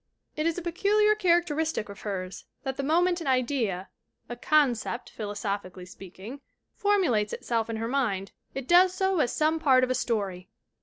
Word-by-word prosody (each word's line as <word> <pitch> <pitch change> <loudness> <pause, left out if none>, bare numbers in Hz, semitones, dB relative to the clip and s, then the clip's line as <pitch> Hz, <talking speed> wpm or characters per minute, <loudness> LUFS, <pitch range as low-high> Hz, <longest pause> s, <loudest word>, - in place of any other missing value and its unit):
It 310 +1 0
is 335 - -1
a 360 - -4
peculiar 410 +5 +3
characteristic 340 - +1
of 200 0 -11
hers 190 -3 -5 0.2
that 265 -2 -3
the 275 - -3
moment 345 +5 +2
an 315 - -5
idea 240 -8 0 0.4
a 240 - -4
"concept" 245 -3 +1
philosophically 200 -3 -5
speaking 195 +7 -11 0.3
for 410 -2 +2
mulates 225 - +1
itself 230 -1 -2
in 225 - -2
her 225 +1 -3
mind 220 -7 -1 0.2
it 270 -1 -5
does 360 +1 +5
so 380 -1 +1
as 245 - +2
some 315 +1 +1
part 265 -5 +4
of 255 - +1
a - - +3
story. 195 -7 -2
255 Hz, 170 wpm, -27 LUFS, 210-335 Hz, 0.4 s, does